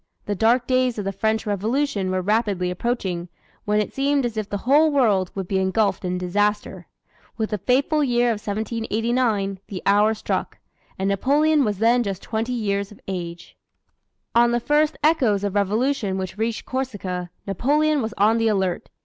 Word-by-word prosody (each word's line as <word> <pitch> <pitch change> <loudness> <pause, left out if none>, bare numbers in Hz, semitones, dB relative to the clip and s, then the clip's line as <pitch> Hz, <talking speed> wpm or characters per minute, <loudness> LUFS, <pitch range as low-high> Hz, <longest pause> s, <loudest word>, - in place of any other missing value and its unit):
The 205 - -1
dark 230 +5 +2
days 255 -2 +1
of 205 - -3
the 195 - -1
French 220 +3 -1
Revolution 210 +1 -1
were 185 0 -1
rapidly 200 -3 0
approaching, 180 -4 -2 0.4
when 210 0 +2
it 210 - -2
seemed 275 0 +1
as 235 -2 -3
if 215 -2 -3
the 205 - -2
whole 300 +4 +5
world 210 -10 +2
would 190 -2 -4
be 190 0 0
engulfed 200 +3 +1
in 180 0 -2
disaster. 195 0 -1 0.5
With 220 -2 -2
the 210 - -1
fateful 280 - +2
year 245 -2 +2
of 215 -3 -1
1789, 220 -1 -1
the 190 -3 -7
hour 210 +2 +4
struck 215 - -3 0.4
and 190 - -1
Napoleon 285 +9 +3
was 210 -4 -1
then 235 +4 +3
just 195 -5 -4
twenty 225 +2 -2
years 200 -3 -1
of 210 - -14
age. 175 -3 -6 0.8
On 235 0 +5
the 240 0 +1
first 300 +4 +1
echoes 250 -11 +3
of 200 -2 -1
Revolution 210 +1 0
which 190 -1 -4
reached 225 +1 -2
Corsica, 195 -9 -4 0.2
Napoleon 290 - +1
was 220 0 -4
on 220 +3 +3
the 225 - +2
alert. 190 -4 -1
215 Hz, 175 wpm, -23 LUFS, 195-245 Hz, 0.8 s, whole